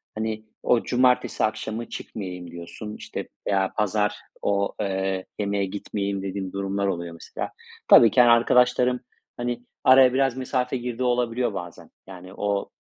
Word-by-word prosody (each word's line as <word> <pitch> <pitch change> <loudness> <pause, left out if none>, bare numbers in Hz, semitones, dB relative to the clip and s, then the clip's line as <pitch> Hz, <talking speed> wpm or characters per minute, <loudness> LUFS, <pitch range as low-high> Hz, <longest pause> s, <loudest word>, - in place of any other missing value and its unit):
hani, 110 0 -3 0.2
"O 120 - +3
cumartesi 125 -1 +2
akşamı 110 +1 -2
çıkmayayım." 90 -4 -7
diyorsun, 85 +5 -8
işte, - - -6 0.2
ya, 95 -1 +1
"Pazar, 105 0 +1 0.3
o, 100 0 0
eee, 95 -1 -1
yemeğe 100 -1 0
gitmeyeyim." 100 0 -3
dediğim 95 -1 -4
durumlar 100 0 -1
oluyor, 85 -2 -3
mesela. 85 - -6 0.4
Tabii 115 - +8
ki, 125 - +6
hani, 120 - +6
arkadaşlarım, 125 +1 +4 0.4
hani, 120 0 -3 0.2
araya 130 -1 +7
biraz 135 -1 +1
mesafe 130 0 -1
girdiği 125 0 -4
olabiliyor 120 -2 +1
bazen. 90 -3 -8 0.2
Yani, 95 0 -11
o 100 -1 -1
105 Hz, 140 wpm, -25 LUFS, 95-125 Hz, 0.4 s, Tabii